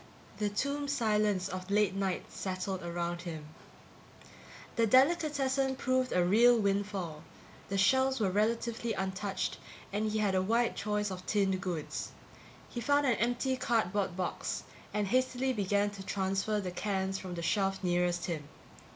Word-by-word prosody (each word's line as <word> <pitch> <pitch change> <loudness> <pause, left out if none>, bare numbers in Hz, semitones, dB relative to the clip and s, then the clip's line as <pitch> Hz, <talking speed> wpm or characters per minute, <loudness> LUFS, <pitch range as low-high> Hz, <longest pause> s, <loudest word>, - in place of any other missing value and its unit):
The 210 -1 +1
tomb 280 +7 -1
silence 210 -7 +1
of 185 0 -6
late 205 -2 +3
night 195 -1 -1
settled 190 0 -3
around 175 0 -3
him. 160 -4 -7 1.3
The 230 -1 +3
delicatessen 270 -1 +3
proved 255 -1 0
a 180 -1 +3
real 235 +6 +6
windfall. 195 -6 -1 0.5
The 195 - -1
shelves 260 +6 +3
were 200 -4 +1
relatively 230 +2 0
untouched 190 +1 -2 0.3
and 215 +1 0
he 215 - 0
had 205 -3 +2
a 185 - +3
wide 230 +5 +1
choice 210 -1 -1
of 185 -1 -6
tinned 195 -3 +1
goods. 175 -6 -4 0.5
He 240 - -5
found 285 +2 +3
an 245 -5 +3
empty 245 +3 +1
cardboard 205 -7 0
box 185 - -2 0.3
and 210 0 0
hastily 255 +3 +1
began 205 -1 +1
to 200 -1 -9
transfer 195 +2 0
the 185 -3 -3
cans 190 0 -1
from 185 -2 -6
the 170 - -4
shelf 195 +1 0
nearest 175 -1 +1
him. 155 -5 -4
205 Hz, 150 wpm, -32 LUFS, 185-235 Hz, 1.3 s, real